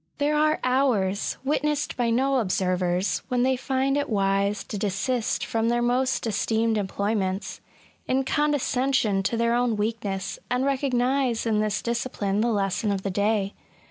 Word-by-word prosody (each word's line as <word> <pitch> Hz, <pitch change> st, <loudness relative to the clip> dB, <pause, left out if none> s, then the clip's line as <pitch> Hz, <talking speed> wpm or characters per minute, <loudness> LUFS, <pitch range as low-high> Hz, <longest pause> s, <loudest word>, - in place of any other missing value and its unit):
There 295 Hz, +1 st, +1 dB
are 305 Hz, +1 st, +2 dB
hours, 245 Hz, -7 st, +1 dB
witnessed 300 Hz, +2 st, 0 dB
by 240 Hz, -2 st, 0 dB
no 265 Hz, +4 st, +2 dB
observers, 185 Hz, -3 st, 0 dB
when 250 Hz, -2 st, +1 dB
they 260 Hz, 0 st, +3 dB
find 265 Hz, +1 st, 0 dB
it 285 Hz, 0 st, -1 dB
wise 200 Hz, -1 st, +1 dB
to 210 Hz, -, -6 dB
desist 215 Hz, +4 st, -1 dB
from 225 Hz, 0 st, 0 dB
their 240 Hz, 0 st, +1 dB
most 255 Hz, +2 st, +1 dB
esteemed 225 Hz, +1 st, +1 dB
employments, 200 Hz, -1 st, -2 dB, 0.5 s
in 265 Hz, +1 st, +1 dB
con 295 Hz, +2 st, +1 dB
descension 255 Hz, -7 st, +1 dB
to 230 Hz, -, 0 dB
their 235 Hz, 0 st, +2 dB
own 240 Hz, -1 st, +1 dB
weakness, 200 Hz, -3 st, -3 dB
and 250 Hz, +2 st, +1 dB
recognise 260 Hz, -2 st, +1 dB
in 220 Hz, -2 st, +1 dB
this 215 Hz, -1 st, -1 dB
discipline 230 Hz, -4 st, -1 dB
the 235 Hz, -, +2 dB
lesson 205 Hz, +1 st, 0 dB
of 195 Hz, -1 st, -2 dB
the 195 Hz, -, -2 dB
day. 205 Hz, 0 st, 0 dB
230 Hz, 155 wpm, -25 LUFS, 200-260 Hz, 0.5 s, they